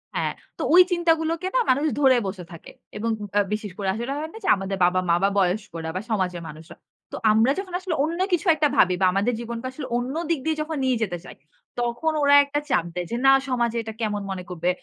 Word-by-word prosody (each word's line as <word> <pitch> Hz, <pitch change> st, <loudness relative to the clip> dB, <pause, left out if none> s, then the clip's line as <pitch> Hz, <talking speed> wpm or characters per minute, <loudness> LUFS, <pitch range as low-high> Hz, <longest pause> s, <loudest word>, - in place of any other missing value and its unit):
হ্যাঁ, -, -, -1 dB, 0.2 s
তো -, -, -6 dB
ওই 365 Hz, -, +9 dB
চিন্তাগুলোকে 330 Hz, 0 st, +1 dB
না -, -, +5 dB
মানুষ 280 Hz, +4 st, +3 dB
ধরে 265 Hz, -3 st, +5 dB
বসে 190 Hz, -1 st, -6 dB
থাকে। 170 Hz, -, -11 dB, 0.3 s
এবং 230 Hz, +2 st, -2 dB, 0.2 s
ব্যা 205 Hz, -, +3 dB
বিশেষ 210 Hz, -2 st, -4 dB
করে 200 Hz, -2 st, -3 dB
আসলে 235 Hz, +5 st, -4 dB
হয় 315 Hz, +2 st, -4 dB
না -, -, -9 dB
যে, -, -, -4 dB
আমাদের 195 Hz, 0 st, -4 dB
বাবা-মা 180 Hz, -1 st, +2 dB
বা 195 Hz, -, +4 dB
বয়স্করা 180 Hz, -4 st, -1 dB
বা 185 Hz, -, -2 dB
সমাজের 185 Hz, -5 st, -1 dB
মানুষরা। 155 Hz, +1 st, -12 dB, 0.3 s
তো -, -, -5 dB, 0.2 s
আমরা 225 Hz, +4 st, +4 dB
যখন 380 Hz, -2 st, -7 dB
আসলে 365 Hz, -4 st, -3 dB
অন্য 335 Hz, +3 st, -2 dB
কিছু 355 Hz, +2 st, 0 dB
একটা 300 Hz, -1 st, +2 dB
ভাবি 180 Hz, 0 st, +4 dB
বা -, -, +5 dB
আমাদের 205 Hz, +6 st, +1 dB
জীবনকে 235 Hz, +1 st, -5 dB
আসলে 265 Hz, +1 st, -7 dB
অন্য 250 Hz, +4 st, -3 dB
দিক 330 Hz, -3 st, +1 dB
দিয়ে 320 Hz, -1 st, 0 dB
যখন 310 Hz, 0 st, -4 dB
নিয়ে 255 Hz, -2 st, +2 dB
যেতে 175 Hz, -4 st, -3 dB
চাই, -, -, -11 dB, 0.4 s
তখন 240 Hz, +7 st, -1 dB
ওরা 285 Hz, 0 st, +5 dB
একটা 285 Hz, +1 st, -2 dB
চাপ 170 Hz, -, +2 dB
দেয়, 180 Hz, 0 st, -3 dB
যে, -, -, -1 dB
না 270 Hz, -, +8 dB, 0.2 s
সমাজে 235 Hz, -2 st, 0 dB
এটা 220 Hz, -, -7 dB
কেমন 210 Hz, -2 st, -1 dB
মনে 185 Hz, -1 st, -5 dB
করবে। 175 Hz, 0 st, -2 dB
235 Hz, 225 wpm, -24 LUFS, 190-295 Hz, 0.4 s, ওই